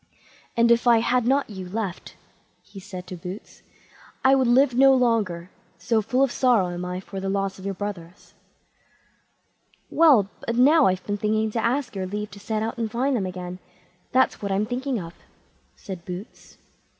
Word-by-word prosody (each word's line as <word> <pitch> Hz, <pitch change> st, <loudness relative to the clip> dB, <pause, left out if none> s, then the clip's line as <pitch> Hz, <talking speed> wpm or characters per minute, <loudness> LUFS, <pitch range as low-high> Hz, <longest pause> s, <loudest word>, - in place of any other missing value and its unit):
"And 235 Hz, 0 st, +4 dB
if 235 Hz, +1 st, +3 dB
I 235 Hz, -1 st, +7 dB
had 240 Hz, +1 st, +1 dB
not 275 Hz, +2 st, +2 dB
you 190 Hz, -4 st, -8 dB
left", 200 Hz, -2 st, -5 dB, 0.5 s
he 200 Hz, -1 st, -12 dB
said 185 Hz, -1 st, -9 dB
to 180 Hz, -, -7 dB
Boots, 180 Hz, +4 st, -9 dB, 0.6 s
"I 265 Hz, -, +6 dB
would 265 Hz, -2 st, +3 dB
live 255 Hz, +2 st, +4 dB
no 270 Hz, +2 st, +6 dB
longer, 210 Hz, -8 st, 0 dB, 0.3 s
so 225 Hz, -2 st, +1 dB
full 250 Hz, +5 st, +1 dB
of 270 Hz, -, +1 dB
sorrow 240 Hz, -9 st, +2 dB
am 175 Hz, 0 st, -5 dB
I 180 Hz, 0 st, -4 dB
for 195 Hz, +1 st, -8 dB
the 195 Hz, 0 st, -3 dB
loss 195 Hz, 0 st, -2 dB
of 190 Hz, -, -10 dB
your 195 Hz, -1 st, -3 dB
brothers." 185 Hz, -2 st, -7 dB, 1.6 s
"Well, 280 Hz, -, +5 dB, 0.2 s
but 235 Hz, -, -1 dB
now 285 Hz, +5 st, +5 dB
I've 185 Hz, 0 st, -1 dB
been 205 Hz, 0 st, -2 dB
thinking 215 Hz, +1 st, 0 dB
to 225 Hz, +1 st, -2 dB
ask 250 Hz, 0 st, -1 dB
your 190 Hz, -1 st, -3 dB
leave 210 Hz, +1 st, -5 dB
to 200 Hz, -, -11 dB
set 215 Hz, +1 st, -2 dB
out 230 Hz, +2 st, -4 dB
and 225 Hz, -1 st, -1 dB
find 255 Hz, +4 st, 0 dB
them 195 Hz, -5 st, -1 dB
again; 180 Hz, 0 st, -7 dB, 0.5 s
that's 260 Hz, +1 st, +2 dB
what 200 Hz, -1 st, -3 dB
I'm 195 Hz, +2 st, +1 dB
thinking 250 Hz, +1 st, -2 dB
of", 170 Hz, -2 st, -8 dB, 0.6 s
said 185 Hz, -4 st, -8 dB
Boots. 180 Hz, +5 st, -9 dB
210 Hz, 185 wpm, -24 LUFS, 190-245 Hz, 1.6 s, I